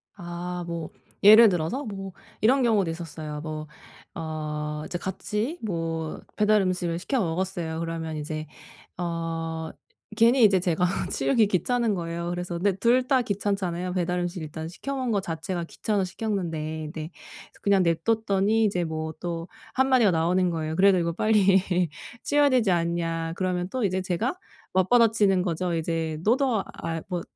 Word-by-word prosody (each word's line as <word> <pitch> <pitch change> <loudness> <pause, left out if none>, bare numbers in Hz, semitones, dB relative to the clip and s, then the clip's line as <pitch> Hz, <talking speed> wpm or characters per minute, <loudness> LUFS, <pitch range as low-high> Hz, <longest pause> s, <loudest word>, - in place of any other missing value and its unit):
아. 175 -1 -5
뭐 170 -2 -4 0.3
예를 215 +2 +9
들어서 180 - -1
뭐 195 -3 -6 0.3
이런 260 +6 +4
경우도 210 -7 +3
있었어요. 155 -2 -6
뭐 155 -1 -5 0.5
어 150 -1 -4
이제 175 - -3
같이 210 - -3
뭐 165 -5 -3 0.2
배달 210 0 +4
음식을 180 -2 -1
시켜 260 +9 -1
먹었어요. 170 -3 -2
그러면 165 -1 -4
이제 155 +1 -4 0.5
어 165 -2 -3 0.5
괜히 235 +2 +5
이제 195 -3 +6
제가 180 0 +1 0.2
치우기 135 - +3
귀찮은 225 +4 +1
거예요. 170 -1 -3
그래서 175 0 -4
근데 190 +2 +1
둘 245 +4 +3
다 265 -2 +4
귀찮잖아요. 190 -4 -2
배달 180 -1 0
음식 175 0 -3
일단 160 +1 -6
시켜 275 +10 -5
먹은 255 -3 -1
것 200 -2 +1
자체가 170 0 -4
귀찮아서 205 +3 -1
시켰는데 180 -5 -3 0.3
근데 155 +1 -6
그래서 - - -16
그냥 200 -2 +3
냅뒀더니 205 +5 +2
이제 180 -4 +1
뭐 160 0 -4
또 170 -1 -4 0.3
1 265 +1 +3
마디가 250 -6 +5
나오는 175 +2 +2
거예요. 160 -1 -2
"그래도 190 +1 +5
이거 170 -1 0
빨리 195 0 +4 0.6
치워야 290 -1 +4
되지 235 -7 +3
않냐?" 165 -1 -1
그러면 180 -1 -1
또 255 0 -2
이제 190 -1 +1
제가 190 - -1 0.4
맞받아치는 205 -1 +4
거죠. 175 0 -1
이제 160 -1 -2
"너도 240 -1 +2
아이 165 0 -4
뭐 180 -2 -2
180 Hz, 330 characters per minute, -26 LUFS, 165-210 Hz, 0.6 s, 예를